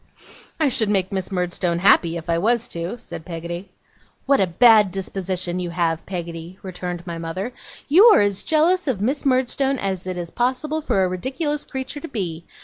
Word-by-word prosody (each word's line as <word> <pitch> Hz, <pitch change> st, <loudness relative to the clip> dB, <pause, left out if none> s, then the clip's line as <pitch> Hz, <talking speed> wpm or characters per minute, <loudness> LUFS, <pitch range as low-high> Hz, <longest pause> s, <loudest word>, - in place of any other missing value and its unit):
'I 310 Hz, -3 st, +3 dB
should 220 Hz, -4 st, +1 dB
make 190 Hz, -2 st, +1 dB
Miss 190 Hz, 0 st, -3 dB
Murdstone 180 Hz, -1 st, -1 dB
happy, 170 Hz, -2 st, +4 dB
if 165 Hz, -, -8 dB
I 165 Hz, 0 st, +1 dB
was 235 Hz, +4 st, +1 dB
to,' 170 Hz, +7 st, -5 dB
said 220 Hz, -7 st, -8 dB
Peggotty. 170 Hz, +2 st, -6 dB, 0.6 s
'What 275 Hz, 0 st, +3 dB
a 190 Hz, -, +3 dB
bad 215 Hz, +2 st, +6 dB
disposition 185 Hz, -1 st, -3 dB
you 180 Hz, -1 st, -3 dB
have, 170 Hz, -2 st, -1 dB
Peggotty!' 170 Hz, -1 st, -6 dB
returned 180 Hz, -2 st, -5 dB
my 170 Hz, -2 st, -5 dB
mother. 185 Hz, +8 st, -4 dB, 0.3 s
'You 355 Hz, +9 st, +7 dB
are 455 Hz, -, +8 dB
as 200 Hz, -1 st, 0 dB
jealous 330 Hz, +3 st, +2 dB
of 250 Hz, -8 st, 0 dB
Miss 270 Hz, +7 st, 0 dB
Murdstone 265 Hz, +1 st, +1 dB
as 190 Hz, -4 st, -3 dB
it 185 Hz, -1 st, -3 dB
is 170 Hz, -1 st, -5 dB
possible 275 Hz, +6 st, -1 dB
for 195 Hz, -9 st, +1 dB
a -, -, +2 dB
ridiculous 265 Hz, -, -2 dB
creature 265 Hz, +2 st, -5 dB
to 330 Hz, -, -7 dB
be. 175 Hz, -, -4 dB
190 Hz, 185 wpm, -22 LUFS, 175-255 Hz, 0.6 s, are